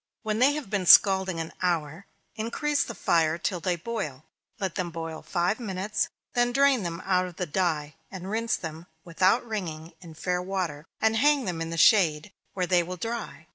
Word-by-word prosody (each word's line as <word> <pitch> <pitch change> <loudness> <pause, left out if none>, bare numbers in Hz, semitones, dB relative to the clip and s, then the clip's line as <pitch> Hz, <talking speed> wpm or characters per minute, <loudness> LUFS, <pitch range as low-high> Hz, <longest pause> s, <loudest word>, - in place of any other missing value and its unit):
When 215 -1 -1
they 270 +3 +5
have 290 -9 -6
been 195 -4 -1
scalding 190 -3 +6
an 165 0 -5
hour, 170 0 -1 0.3
increase 280 +7 -1
the 235 - -7
fire 165 -2 +2
till 180 +1 -2
they 175 +1 0
boil. 165 - -5 0.3
Let 190 -3 -2
them 180 -2 -2
boil 165 -1 -6
five 180 +5 -1
minutes; 200 -2 -2 0.2
then 240 0 +2
drain 275 -1 +4
them 170 -1 -5
out 185 -1 +2
of 180 - -11
the 180 - -2
dye, 155 -3 -1 0.2
and 190 -1 -8
rinse 225 +1 0
them, 160 +1 -7 0.2
without 185 +7 +2
wringing, 170 -7 -5
in 165 -3 -12
fair 180 +2 -1
water, 180 -5 -3
and 220 0 +2
hang 290 +2 +3
them 175 -3 -3
in 165 - -3
the 165 - -4
shade, 165 -2 +4 0.2
where 185 -2 0
they 180 -1 +3
will 180 +2 -6
dry. 225 -5 -5
185 Hz, 190 wpm, -27 LUFS, 165-220 Hz, 0.3 s, scalding